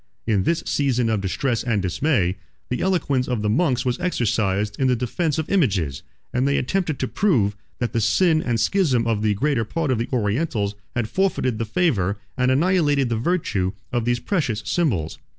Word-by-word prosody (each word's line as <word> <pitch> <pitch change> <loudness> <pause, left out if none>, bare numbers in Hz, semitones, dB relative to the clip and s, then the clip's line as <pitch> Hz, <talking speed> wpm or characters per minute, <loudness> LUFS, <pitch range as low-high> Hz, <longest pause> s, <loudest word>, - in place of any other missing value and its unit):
16 115 - +1
In 95 -2 +2
this 170 0 +1
season 125 -5 +1
of 110 -3 0
distress 115 +6 -1
and 115 -4 0
dismay, 95 - +1 0.3
the 125 - -2
eloquence 145 -9 +1
of 120 -4 -1
the 105 - +1
monks 130 -2 +1
was 125 -1 0
exercised 105 - 0
in 135 - +3
the 125 - +3
defence 140 +7 -1
of 160 0 -2
images; 100 - +1 0.3
and 125 +2 +1
they 140 - +2
attempted 160 +2 -1
to 130 - -2
prove, 120 - +1 0.2
that 120 - -2
the 115 - +1
sin 155 - +3
and 120 -5 -1
schism 130 - +2
of 115 -2 0
the 105 -1 +1
greatest 120 -2 0
part 160 -5 -1
of 120 - +1
the 115 - -2
Orientals 110 -2 0 0.2
had 120 -2 0
forfeited 130 - 0
the 115 - -1
favor, 105 - +1 0.2
and 125 -1 +1
annihilated 145 -2 +2
the 115 - 0
virtue, 110 - 0 0.2
of 120 -2 -1
these 120 0 +1
precious 120 - -1
symbols. 110 - 0
125 Hz, 190 wpm, -22 LUFS, 105-150 Hz, 0.3 s, in